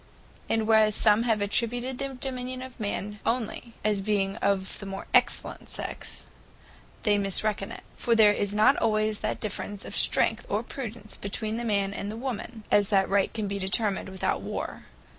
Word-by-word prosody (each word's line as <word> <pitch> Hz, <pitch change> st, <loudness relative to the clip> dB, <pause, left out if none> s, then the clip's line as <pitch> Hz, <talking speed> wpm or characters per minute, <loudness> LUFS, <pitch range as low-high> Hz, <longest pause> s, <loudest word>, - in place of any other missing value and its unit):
And 225 Hz, -1 st, +1 dB
whereas 215 Hz, -1 st, +5 dB
some 210 Hz, 0 st, +5 dB
have 215 Hz, -2 st, +2 dB
attributed 245 Hz, +5 st, 0 dB
the 275 Hz, -1 st, -3 dB
Dominion 255 Hz, -1 st, -3 dB
to 260 Hz, -, -6 dB
the -, -, -11 dB
Man 210 Hz, 0 st, -3 dB
onely, 230 Hz, 0 st, -2 dB
as 210 Hz, -2 st, +2 dB
being 195 Hz, -1 st, 0 dB
of 195 Hz, -3 st, 0 dB
the 200 Hz, -, -6 dB
more 195 Hz, 0 st, -5 dB
excellent -, -, +2 dB
Sex; -, -, -4 dB, 0.8 s
they 205 Hz, -2 st, +3 dB
misreckon 200 Hz, +1 st, +2 dB
in -, -, -8 dB
it. -, -, -10 dB
For 235 Hz, -, +1 dB
there 215 Hz, -2 st, +7 dB
is 205 Hz, -1 st, -1 dB
not 210 Hz, +1 st, +5 dB
always 215 Hz, -1 st, +1 dB
that -, -, -2 dB
difference 205 Hz, -2 st, -4 dB
of -, -, -6 dB
strength -, -, +2 dB
or -, -, 0 dB
prudence 225 Hz, -5 st, -6 dB
between 215 Hz, +2 st, -3 dB
the 240 Hz, -, -3 dB
man 200 Hz, -3 st, +1 dB
and 200 Hz, +1 st, -4 dB
the 220 Hz, -, -6 dB
woman, 235 Hz, -2 st, -5 dB
as 205 Hz, -1 st, +4 dB
that 195 Hz, -2 st, +4 dB
the -, -, -6 dB
right 200 Hz, -1 st, +2 dB
can 215 Hz, -3 st, -3 dB
be 200 Hz, 0 st, -3 dB
determined 195 Hz, +1 st, +1 dB
without 190 Hz, -1 st, -1 dB
War. -, -, -5 dB
215 Hz, 190 wpm, -27 LUFS, 200-230 Hz, 0.8 s, there